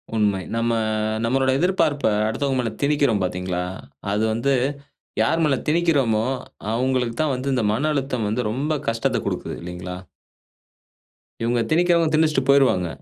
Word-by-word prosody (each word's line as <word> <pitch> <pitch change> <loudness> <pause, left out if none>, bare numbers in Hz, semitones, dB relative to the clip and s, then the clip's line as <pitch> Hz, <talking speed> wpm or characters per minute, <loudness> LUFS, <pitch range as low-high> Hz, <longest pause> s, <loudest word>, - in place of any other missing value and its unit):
உண்மை. 105 -3 +1
நம்ம 115 0 +1 0.5
நம்மளோட 130 +3 +1
எதிர்பார்ப்ப 165 -5 +1 0.2
அடுத்தவங்க 130 +4 -1
மேல 120 -2 0
திணிக்கிறோம் 140 -7 +2
பாத்தீங்களா? 90 0 -2 0.5
அது 105 +2 +1
வந்து 120 +5 +1 0.7
யார் 165 - +2
மேல 150 -3 +3
திணிக்கிறோமோ, 145 -9 +2 0.5
அவுங்களுக்கு 125 -1 0
தான் 155 -3 +1
வந்து 130 +2 -2
இந்த 125 -3 +1
மன 140 +8 0
அழுத்தம் 130 -6 -1
வந்து 110 +4 0
ரொம்ப 140 +7 -1 0.2
கஷ்டத்த 115 0 0
குடுக்குது, - - -3
இல்லைங்களா? 90 +1 -6 1.5
இவுங்க 120 +1 +1
திணிக்கிறவங்க 170 -1 +3
திணிச்சுட்டு 155 -3 +3
போயிருவாங்க. 135 -10 +4
130 Hz, 130 wpm, -22 LUFS, 110-150 Hz, 1.5 s, போயிருவாங்க